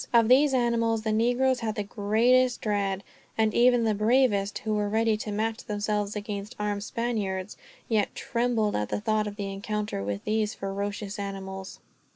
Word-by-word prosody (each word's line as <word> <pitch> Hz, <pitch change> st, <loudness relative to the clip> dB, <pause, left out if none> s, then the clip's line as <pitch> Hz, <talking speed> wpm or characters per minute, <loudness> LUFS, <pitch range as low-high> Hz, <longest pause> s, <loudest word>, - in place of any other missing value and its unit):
Of 230 Hz, -1 st, +5 dB
these 270 Hz, +2 st, +5 dB
animals 230 Hz, -2 st, +1 dB
the 220 Hz, -, 0 dB
negroes 245 Hz, +3 st, +2 dB
had 220 Hz, -2 st, -2 dB
the 210 Hz, -, -2 dB
greatest 235 Hz, +5 st, +2 dB
dread; 200 Hz, -2 st, -1 dB, 0.3 s
and 220 Hz, -1 st, +2 dB
even 245 Hz, 0 st, +4 dB
the 220 Hz, -1 st, +2 dB
bravest, 215 Hz, -2 st, +2 dB
who 215 Hz, -, -2 dB
were 210 Hz, -1 st, 0 dB
ready 220 Hz, +1 st, +2 dB
to 210 Hz, 0 st, -5 dB
match 220 Hz, +2 st, -2 dB
themselves 210 Hz, -1 st, -1 dB
against 205 Hz, 0 st, -5 dB
armed 205 Hz, -1 st, -1 dB
Spaniards, 210 Hz, -5 st, -2 dB, 0.3 s
yet 215 Hz, -3 st, 0 dB
trembled 235 Hz, -3 st, 0 dB
at 105 Hz, 0 st, -1 dB
the -, -, -1 dB
thought 215 Hz, 0 st, 0 dB
of 205 Hz, -, -6 dB
the 200 Hz, -1 st, -4 dB
encounter 210 Hz, -, -3 dB
with 100 Hz, 0 st, -3 dB
these 215 Hz, 0 st, 0 dB
ferocious 200 Hz, +1 st, -4 dB
animals. 195 Hz, -1 st, -6 dB
215 Hz, 170 wpm, -27 LUFS, 205-230 Hz, 0.3 s, Of